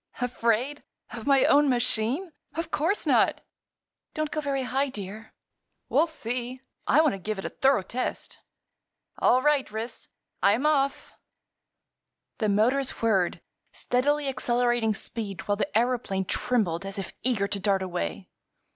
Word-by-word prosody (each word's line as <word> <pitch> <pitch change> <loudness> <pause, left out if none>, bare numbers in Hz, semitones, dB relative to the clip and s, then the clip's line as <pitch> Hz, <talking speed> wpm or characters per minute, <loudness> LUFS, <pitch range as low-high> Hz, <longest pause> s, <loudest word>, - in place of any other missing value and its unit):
"Afraid! 245 +3 0 0.3
Of 230 +1 -7
my 275 -2 +5
own 290 0 +5
machine? 250 - 0 0.2
Of 330 0 -3
course 335 +8 0
not." - - +3 0.7
"Don't 310 -1 -2
go 305 - -2
very 275 -2 -1
high, 270 +2 0
dear." 215 -1 -8 0.6
"We'll 335 - +3
see. 250 -3 -5 0.3
I 310 - +6
want 310 -3 +3
to 195 - -5
give 215 +3 -3
it 195 - -6
a - - -2
thorough 265 -7 +2
test. 250 +7 -4 0.8
All 255 +1 +4
right, 295 -3 +2
Ris; 220 +3 -6 0.3
I'm 215 +8 +3
off!" 280 -2 +1 1.3
The 215 -3 +1
motors 245 +6 +1
whirred, 195 -6 +2 0.3
steadily 285 +4 0
accelerating 240 -3 +1
speed 200 -4 -4
while 205 0 +1
the 250 - -1
aëroplane 225 -5 0
trembled 195 -9 +1
as 195 +1 -5
if 195 - -5
eager 220 -5 +1
to 200 - -2
dart 195 -1 +1
away. 85 - -4
245 Hz, 140 wpm, -27 LUFS, 210-275 Hz, 1.3 s, I